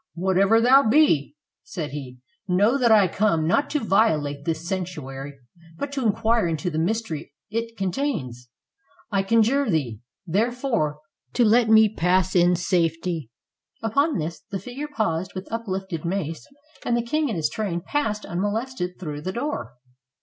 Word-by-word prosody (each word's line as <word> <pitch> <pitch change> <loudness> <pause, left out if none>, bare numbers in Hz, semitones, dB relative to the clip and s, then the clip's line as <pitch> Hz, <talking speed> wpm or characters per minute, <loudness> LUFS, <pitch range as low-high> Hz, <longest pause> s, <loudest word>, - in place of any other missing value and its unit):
"Whatever 190 +5 +3
thou 250 0 +5
be," 220 - +3 0.3
said 155 -4 -5
he, 135 -3 -7 0.3
"know 200 +7 +3
that 245 -4 +3
I 210 -3 +6
come 170 -4 +1
not 280 - +2
to 300 - 0
violate 150 - +1
this 165 0 -2
sanctuary, 145 -7 -5 0.4
but 285 +7 -4
to 275 -2 -2
inquire 225 -1 +2
into 165 +2 -2
the 155 - -1
mystery 170 -5 -2 0.2
it 230 +1 -3
contains; 175 - -3 0.6
I 195 -1 +2
conjure 230 +6 +2
thee, 135 - -1 0.3
therefore, 215 - 0 0.3
to 240 - +3
let 225 +1 +4
me 220 0 +7
pass 185 -2 +1
in 175 0 +5
safety." 165 - -1 0.5
Upon 280 +7 +1
this, 165 +1 -4
the 195 - -3
figure 250 +10 -6
paused 185 - -1
with 185 +1 -6
uplifted 190 -7 -4
mace, 170 - -3 0.4
and 240 - +1
the 235 - 0
king 305 +4 0
and 220 - -2
his 160 - +1
train 195 -6 -2
passed 210 +1 -2
unmolested 205 +1 -3
through 150 -4 -5
the 185 - -3
door. 240 - -3
190 Hz, 150 wpm, -24 LUFS, 165-230 Hz, 0.6 s, me